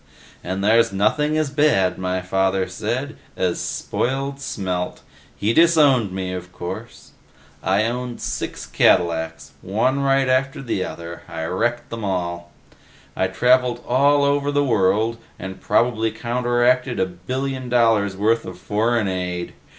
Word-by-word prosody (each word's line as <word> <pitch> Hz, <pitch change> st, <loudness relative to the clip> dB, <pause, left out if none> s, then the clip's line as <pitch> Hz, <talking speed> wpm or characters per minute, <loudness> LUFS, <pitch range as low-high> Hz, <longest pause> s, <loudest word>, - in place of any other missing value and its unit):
And 95 Hz, +2 st, -3 dB
there's 115 Hz, +2 st, +4 dB
nothing 150 Hz, +10 st, +1 dB
as 155 Hz, -3 st, 0 dB
bad, 140 Hz, -13 st, +2 dB
my 95 Hz, 0 st, -2 dB
father 95 Hz, 0 st, +1 dB
said, 120 Hz, +10 st, -3 dB, 0.2 s
as 90 Hz, -2 st, 0 dB
spoiled 135 Hz, +2 st, -2 dB
Smelt. 90 Hz, -7 st, -3 dB, 0.3 s
He 105 Hz, +3 st, 0 dB
disowned 145 Hz, -, +4 dB
me, 95 Hz, -1 st, -3 dB
of 90 Hz, 0 st, -7 dB
course. 90 Hz, 0 st, -8 dB, 0.5 s
I 95 Hz, +3 st, +2 dB
owned 125 Hz, +1 st, -3 dB
six -, -, -4 dB
Cadillacs 80 Hz, -4 st, +1 dB
one 120 Hz, +8 st, 0 dB
right 135 Hz, -1 st, +2 dB
after 130 Hz, +1 st, +1 dB
the 100 Hz, -7 st, -1 dB
other, 85 Hz, -1 st, -7 dB
I 80 Hz, -1 st, -5 dB
wrecked 120 Hz, +8 st, -1 dB
them 115 Hz, -1 st, -5 dB
all. 85 Hz, -3 st, -3 dB, 0.6 s
I 95 Hz, -, +1 dB
traveled 125 Hz, +4 st, +2 dB
all 140 Hz, +3 st, +4 dB
over 140 Hz, 0 st, +1 dB
the 145 Hz, 0 st, +2 dB
world 110 Hz, 0 st, +2 dB, 0.2 s
and 95 Hz, +1 st, -8 dB
probably 115 Hz, -2 st, +2 dB
counteracted 120 Hz, +1 st, +1 dB
a -, -, +3 dB
billion 130 Hz, +9 st, -4 dB
dollars' 115 Hz, -5 st, +2 dB
worth 115 Hz, +3 st, +2 dB
of 90 Hz, -1 st, -8 dB
foreign 105 Hz, +3 st, 0 dB
aid. 90 Hz, -2 st, -3 dB
115 Hz, 135 wpm, -21 LUFS, 95-130 Hz, 0.6 s, there's